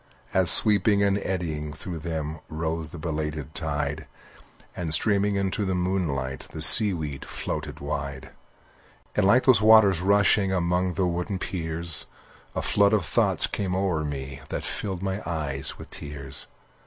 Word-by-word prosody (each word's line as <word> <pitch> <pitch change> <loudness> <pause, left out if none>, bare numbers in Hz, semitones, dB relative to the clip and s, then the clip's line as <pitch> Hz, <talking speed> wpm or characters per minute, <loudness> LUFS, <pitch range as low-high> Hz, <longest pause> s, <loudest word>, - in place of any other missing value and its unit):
As, 95 -3 +2
sweeping 100 0 +6
and 100 0 0
eddying 80 -6 -5
through 85 +2 -8
them 80 -1 -6
Rose 80 0 -5
the 85 - -11
belated 75 -2 -6
tide, 75 -1 -4 0.7
And, 85 -3 -5
streaming 100 +3 0
into 100 +1 -2
the 95 -2 -2
moonlight, 80 -8 -4
The 80 - -5
seaweed 80 - +7
floated - - -7
wide. 70 -2 -6 0.8
And 95 - +1
like 120 +5 +3
those 125 -6 +3
waters 105 -5 +4
rushing 100 0 +2
Among 90 0 -2
the 95 - -1
wooden 90 +3 -4
piers, 85 -4 -1 0.5
A - - -3
flood 100 +1 +1
of 100 -5 0
thoughts - - +3
came 95 -3 -4
o'er 95 -5 -2
me 70 -1 -7
That - - -5
filled 95 -3 -5
my 95 +1 -4
eyes 75 -5 0
with - - -13
tears. 70 -2 -4
85 Hz, 145 wpm, -24 LUFS, 75-95 Hz, 0.8 s, seaweed